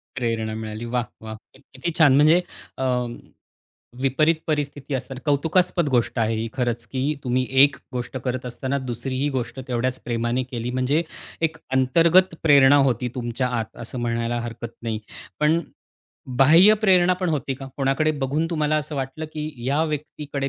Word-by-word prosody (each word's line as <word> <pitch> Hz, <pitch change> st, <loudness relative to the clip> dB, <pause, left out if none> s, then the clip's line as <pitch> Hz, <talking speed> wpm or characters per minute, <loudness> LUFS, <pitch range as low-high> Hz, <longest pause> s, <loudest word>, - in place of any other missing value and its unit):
प्रेरणा 115 Hz, -3 st, -2 dB
मिळाली. 110 Hz, +1 st, -5 dB
वाह, 120 Hz, +1 st, -1 dB, 0.2 s
वाह! 110 Hz, 0 st, -7 dB, 0.2 s
क -, -, -17 dB
किती 135 Hz, +7 st, -3 dB
छान! 145 Hz, -5 st, +6 dB
म्हणजे 155 Hz, +5 st, +5 dB, 0.4 s
अं, 125 Hz, -2 st, -1 dB, 0.9 s
विपरीत 145 Hz, +5 st, +3 dB
परिस्थिती 145 Hz, -2 st, -2 dB
असताना 130 Hz, 0 st, -4 dB
कौतुकास्पद 165 Hz, +4 st, +2 dB
गोष्ट 120 Hz, -1 st, +1 dB
आहे 115 Hz, 0 st, +1 dB
ही 110 Hz, +1 st, -2 dB
खरंच 120 Hz, -3 st, -2 dB
की 130 Hz, -1 st, -3 dB, 0.2 s
तुम्ही 130 Hz, 0 st, 0 dB, 0.2 s
एक 145 Hz, 0 st, +4 dB, 0.2 s
गोष्ट 125 Hz, +1 st, -4 dB
करत 130 Hz, -1 st, -3 dB
असताना 130 Hz, +3 st, -3 dB
दुसरीही 130 Hz, +3 st, -2 dB
गोष्ट 120 Hz, 0 st, -3 dB
तेवढ्याच 125 Hz, +1 st, -1 dB
प्रेमाने 120 Hz, +1 st, -1 dB
केली. 125 Hz, -1 st, -5 dB
म्हणजे 130 Hz, +6 st, +1 dB, 0.4 s
एक 160 Hz, 0 st, -15 dB, 0.2 s
अंतर्गत 165 Hz, +7 st, +4 dB
प्रेरणा 140 Hz, -3 st, +7 dB
होती 125 Hz, 0 st, -1 dB
तुमच्या 125 Hz, +1 st, -2 dB
आत 110 Hz, 0 st, -7 dB
असं 120 Hz, +2 st, -6 dB
म्हणायला 115 Hz, 0 st, -1 dB
हरकत 120 Hz, 0 st, -7 dB
नाही. 115 Hz, -2 st, -3 dB, 0.4 s
पण 155 Hz, +2 st, +3 dB, 0.8 s
बाह्य 165 Hz, +10 st, +7 dB
प्रेरणा 185 Hz, -4 st, +4 dB
पण 185 Hz, -, 0 dB
होती 140 Hz, -4 st, -1 dB
का 135 Hz, +1 st, -9 dB
कोणाकडे 135 Hz, +3 st, +1 dB
बघून 150 Hz, +5 st, 0 dB
तुम्हाला 155 Hz, -2 st, +1 dB
असं 150 Hz, 0 st, -3 dB
वाटलं 135 Hz, +4 st, -4 dB
की 155 Hz, 0 st, -4 dB, 0.2 s
या 145 Hz, +4 st, +2 dB
व्यक्तीकडे 145 Hz, -2 st, -4 dB
130 Hz, 155 wpm, -23 LUFS, 120-150 Hz, 0.9 s, प्रेरणा